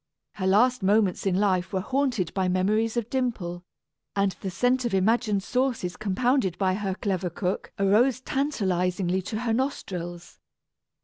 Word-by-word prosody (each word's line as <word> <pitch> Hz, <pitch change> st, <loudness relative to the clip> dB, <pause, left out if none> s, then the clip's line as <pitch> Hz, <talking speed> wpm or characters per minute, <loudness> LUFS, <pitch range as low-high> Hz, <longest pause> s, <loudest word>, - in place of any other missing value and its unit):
Her 190 Hz, -2 st, -2 dB
last 245 Hz, +6 st, +4 dB
moments 200 Hz, -1 st, +2 dB
in 185 Hz, -, +2 dB
life 185 Hz, -2 st, +1 dB
were 190 Hz, -, 0 dB
haunted 245 Hz, -5 st, -1 dB
by 190 Hz, -2 st, 0 dB
memories 215 Hz, +5 st, +1 dB
of 235 Hz, -2 st, -1 dB
Dimple, 205 Hz, -10 st, -2 dB, 0.5 s
and 195 Hz, -2 st, +1 dB
the 195 Hz, -, -3 dB
scent 245 Hz, +7 st, +1 dB
of 235 Hz, -5 st, 0 dB
imagined 210 Hz, 0 st, +2 dB
sauces 250 Hz, -9 st, -1 dB
compounded 215 Hz, -1 st, 0 dB
by 190 Hz, -1 st, +1 dB
her 195 Hz, -1 st, -2 dB
clever 190 Hz, -3 st, -2 dB
cook 180 Hz, +2 st, -3 dB
arose 220 Hz, +7 st, +3 dB
tantalizingly 190 Hz, -10 st, 0 dB
to 215 Hz, +4 st, -4 dB
her 235 Hz, -2 st, 0 dB
nostrils. 180 Hz, -9 st, -4 dB
200 Hz, 145 wpm, -26 LUFS, 185-240 Hz, 0.5 s, last